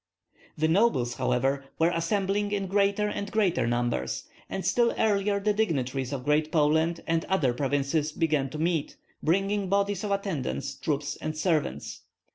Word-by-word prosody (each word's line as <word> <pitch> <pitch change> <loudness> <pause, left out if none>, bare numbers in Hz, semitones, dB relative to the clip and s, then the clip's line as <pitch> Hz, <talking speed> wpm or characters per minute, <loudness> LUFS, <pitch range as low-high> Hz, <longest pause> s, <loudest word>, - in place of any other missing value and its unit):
The 155 +1 +2
nobles, 160 - +2
however, 130 +2 +1
were 165 +1 +3
assembling 195 +4 0
in 200 -1 -1
greater 200 +2 +2
and 200 -1 -4
greater 185 - +2
numbers; 120 - -1 0.3
and 190 - -4
still 240 -1 +2
earlier 205 -2 +2
the 210 +1 +1
dignitaries 135 - -1
of 135 -2 -4
Great 150 +1 +2
Poland 160 +1 +2
and 165 0 +1
other 155 -10 +1
provinces 145 +3 0
began 150 -4 0
to 150 - -7
meet, 160 -1 -1 0.2
bringing 195 +3 +1
bodies 200 0 +1
of 210 - -2
attendant 180 - -2 0.2
troops 145 -2 -2
and 155 0 -4
servants. 155 -2 -1
165 Hz, 150 wpm, -27 LUFS, 140-200 Hz, 0.3 s, were